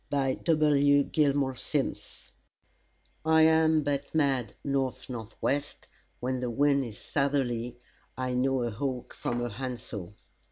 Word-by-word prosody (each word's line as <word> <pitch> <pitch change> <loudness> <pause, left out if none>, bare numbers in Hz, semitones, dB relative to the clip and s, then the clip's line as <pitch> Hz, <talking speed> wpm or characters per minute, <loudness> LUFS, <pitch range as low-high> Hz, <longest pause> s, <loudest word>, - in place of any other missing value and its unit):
By 135 -2 +1
W. 145 -3 +3
GILMORE 140 -2 +1
SIMMS - - -3 0.9
"I 160 0 +5
am 160 -1 +4
but 145 +1 -2
mad 135 -8 +1
north 135 -2 -2
north 115 -3 -7
west: 145 +1 -1 0.3
when 130 +1 -2
the 125 -1 -2
wind 140 +3 +3
is 110 -3 -8
southerly 125 -4 -1 0.4
I 130 -1 -2
know 130 0 +1
a 120 - -1
hawk 125 +2 -4
from 120 0 -2
a - - -3
handsaw." 120 -5 -6
135 Hz, 130 wpm, -29 LUFS, 125-145 Hz, 0.9 s, I